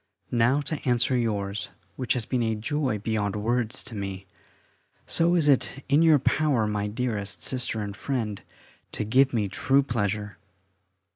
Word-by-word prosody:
Now 120 +4 +3
to 150 +1 -4
answer 120 +1 +3
yours, 105 -4 -1 0.3
which 130 - 0
has 120 -4 -2
been 125 +1 -1
a 110 -1 0
joy 130 +1 -1
beyond 105 -1 -1
words 115 +3 -1
to - - -9
me: 95 -2 -5 0.8
so 170 +1 +2
is 160 -4 +2
it 135 0 +2
in 145 +3 +5
your 160 -2 +6
power, 140 -3 +2
my 105 -1 -1
dearest 105 -3 -3
Sister 125 -4 -1
and 100 -1 -5
friend, 110 -7 -3 0.5
to - - -2
give 130 +6 +4
me 110 -4 0
true 135 +8 +2
pleasure. 105 -4 -2
115 Hz, 155 wpm, -26 LUFS, 105-135 Hz, 0.8 s, your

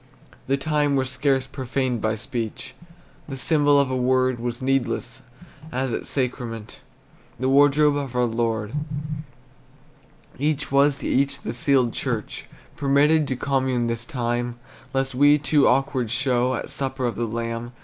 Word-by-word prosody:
The 135 +1 +2
time 145 0 +1
was 130 -1 0
scarce 130 0 +1
profaned 130 -2 -2
by 110 0 0
speech; 115 -1 -5 0.6
The 135 - -5
symbol 145 +1 +3
of 140 -2 +1
a - - 0
word 130 0 +2
Was 120 0 -3
needless, 130 -3 -1 0.5
as 130 -1 -1
at - - -4
sacrament 120 -4 -3 0.6
The 130 - 0
wardrobe 145 +1 +5
of 135 -3 -4
our 125 0 +3
Lord. 115 -2 -1 1.7
Each 150 0 -1
was 140 +1 +4
to - - -5
each 140 +1 +1
the 115 - -4
sealed 130 -3 +2
church, - - -3 0.3
Permitted 145 +2 +3
to 130 - -1
commune 130 -2 0
this 115 0 -2
time, 120 -1 -2 0.4
Lest 135 0 -1
we 145 +3 +5
too 145 0 +3
awkward 130 -2 +1
show 125 +1 +1
At - - -5
supper 135 -1 -2
of 120 - -1
the 120 - -2
Lamb. 115 +1 -4
130 Hz, 150 wpm, -23 LUFS, 120-140 Hz, 1.7 s, wardrobe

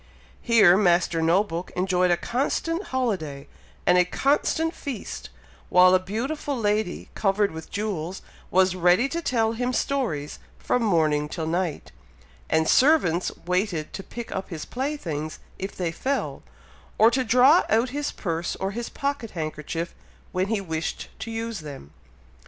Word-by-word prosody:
Here 215 -7 +6
Master 175 -4 +3
No 170 +5 +4
book 175 -3 -5
enjoyed 180 0 +2
a 175 - +3
constant 330 - -1
holiday 185 - -2 0.4
and 180 0 +5
a - - +6
constant 295 - +1
feast, 270 - -6 0.4
while 180 0 +6
a 185 - +6
beautiful 265 +9 -3
lady, 210 -3 -1
covered 200 0 +1
with 160 0 -8
jewels, 190 -4 -3 0.3
was 185 0 +3
ready 180 +8 +4
to 335 +3 -2
tell 225 -7 +1
him 245 +2 -1
stories 230 - -1 0.2
from 250 - 0
morning 155 -8 +2
till 160 0 -4
night, 165 - -2 0.6
and 160 0 +2
servants 250 - +4
waited 180 -3 -1
to - - -5
pick 235 +4 -8
up 190 - -4
his 165 -4 -6
playthings 185 - -4 0.2
if 195 +1 -5
they 175 -3 -2
fell, 270 +11 -2 0.6
or 225 +2 +6
to 260 +1 +1
draw 255 +7 +6
out 230 +3 +3
his 290 +2 -2
purse 170 -2 -3
or 195 +1 -3
his 235 +3 -4
pocket 280 -5 -3
handkerchief 155 +2 -4 0.4
when 185 +1 0
he 220 0 0
wished 160 -4 -4
to 230 - -5
use 225 -1 -4
them. 140 - -9
195 Hz, 150 wpm, -25 LUFS, 170-240 Hz, 0.6 s, Here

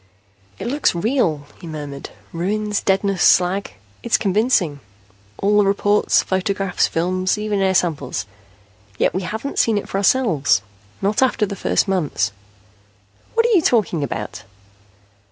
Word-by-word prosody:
"It - - -6
looks 275 -4 +1
real," 170 - 0
he 175 - -10
murmured. 145 -3 -7 0.2
"Ruins, 205 +4 -1
deadness, 195 -1 0
slag. 185 +2 +3 0.3
It's 235 - +2
convincing. 195 - +1 0.6
All 210 +1 +2
the 205 - +4
reports, 205 +1 +2
photographs, 195 0 0
films, 185 +4 0
even 210 -1 -1
air 190 -1 +2
samples. 155 - -1 0.7
Yet - - +1
we 185 - -1
haven't 220 +9 -4
seen 225 -2 +3
it 205 - -4
for 195 - -2
ourselves, 175 - +2 0.4
not 205 +4 +1
after 255 -4 +2
the 200 - -5
first 195 - 0
months 175 -11 0 0.5
..." 100 0 -35
"What 460 0 +3
are 475 - +2
you 365 - +5
talking 200 - +1
about?" 115 -6 -5
195 Hz, 140 wpm, -20 LUFS, 165-210 Hz, 0.7 s, you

